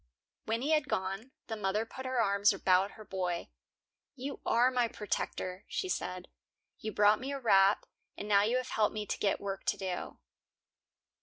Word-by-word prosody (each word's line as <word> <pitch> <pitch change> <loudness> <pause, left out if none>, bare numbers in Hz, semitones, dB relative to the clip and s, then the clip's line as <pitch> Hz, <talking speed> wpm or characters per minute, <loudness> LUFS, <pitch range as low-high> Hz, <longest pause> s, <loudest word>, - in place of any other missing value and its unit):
When 225 +3 -1
he 300 - 0
had 305 -2 +3
gone, 195 +5 -2 0.2
the 225 - -4
mother 210 +1 0
put 260 +3 -7
her 255 -1 0
arms 200 -1 +4
about 190 0 +2
her 215 - -12
boy. 180 -3 -3 0.7
"You 275 +1 -5
are 245 +2 +4
my 245 -2 +2
protector," 190 -3 -3
she 375 - -3
said. 180 - -3 0.5
"You 215 - -4
brought 210 +1 +4
me 265 +2 -4
a 280 - -3
wrap, 195 -4 +4 0.3
and 205 - -5
now 200 -1 +5
you 225 +5 +2
have 255 0 -3
helped 215 0 +1
me 210 -1 -2
to - - -3
get 200 - +1
work 195 -1 -4
to 205 - +1
do." 185 -2 -4
210 Hz, 180 wpm, -32 LUFS, 195-245 Hz, 0.7 s, now